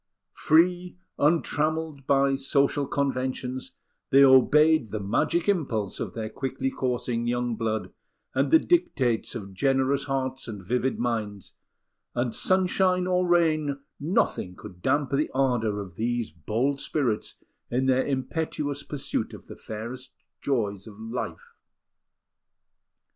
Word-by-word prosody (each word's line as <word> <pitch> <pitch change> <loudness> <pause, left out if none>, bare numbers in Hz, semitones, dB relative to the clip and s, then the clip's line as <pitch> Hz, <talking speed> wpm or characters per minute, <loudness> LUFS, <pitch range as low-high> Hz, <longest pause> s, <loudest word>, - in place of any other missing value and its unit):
Free, 180 +3 +2 0.2
untrammelled 155 -2 0
by 140 0 +3
social 140 +1 +1
conventions, 130 -2 -2 0.4
they 135 +1 +7
obeyed 140 +1 +5
the 110 - -3
magic 150 - 0
impulse 130 - 0
of - - -4
their 110 -1 -3
quickly 135 +3 -3
coursing 120 -2 -2
young 120 -1 0
blood 110 -4 -2 0.4
and 135 +2 +1
the - - +8
dictates 315 - +1
of 100 -4 -7
generous 135 +4 +1
hearts 130 -1 -2
and 105 -5 -7
vivid 125 +5 0
minds; 110 -5 -3 0.6
and, 120 -1 0
sunshine 185 -1 +2
or 180 0 +1
rain, 155 -5 +2 0.2
nothing 140 - 0
could 90 -4 -12
damp 145 +3 +1
the 140 +2 +1
ardour 120 -6 +1
of 95 -4 -8
these 120 -2 -1
bold 115 - -1
spirits 125 -9 -1 0.3
in 130 +2 0
their 130 0 +3
impetuous 145 +1 -2
pursuit 140 0 -4
of - - -13
the - - -10
fairest 115 +4 -7 0.3
joys 105 -7 -1
of 105 -1 -12
life. 115 +3 -6
130 Hz, 125 wpm, -26 LUFS, 115-145 Hz, 0.6 s, the